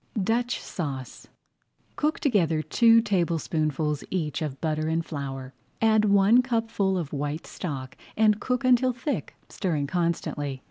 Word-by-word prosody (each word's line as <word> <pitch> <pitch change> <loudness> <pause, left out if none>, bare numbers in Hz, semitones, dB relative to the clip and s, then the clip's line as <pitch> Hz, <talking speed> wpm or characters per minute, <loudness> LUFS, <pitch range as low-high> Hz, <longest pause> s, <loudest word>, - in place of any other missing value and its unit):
DUTCH 235 +5 0
SAUCE 135 -7 -6 0.7
Cook 300 +1 0
together 170 - +2
two 230 +3 +5
tablespoonfuls 160 - 0
each 165 -4 -2
of 145 -4 -4
butter 155 -1 -1
and 165 +1 0
flour, 135 -3 -6 0.3
add 220 -1 +4
one 200 +4 +5
cupful 225 -6 0
of 160 -5 -4
white 145 +2 -3
stock, 135 -6 -6 0.2
and 215 -1 +4
cook 250 0 -1
until 255 0 +4
thick, 255 +5 -4
stirring 160 -7 -2
constantly. 150 -4 -2
175 Hz, 130 wpm, -26 LUFS, 150-225 Hz, 0.7 s, two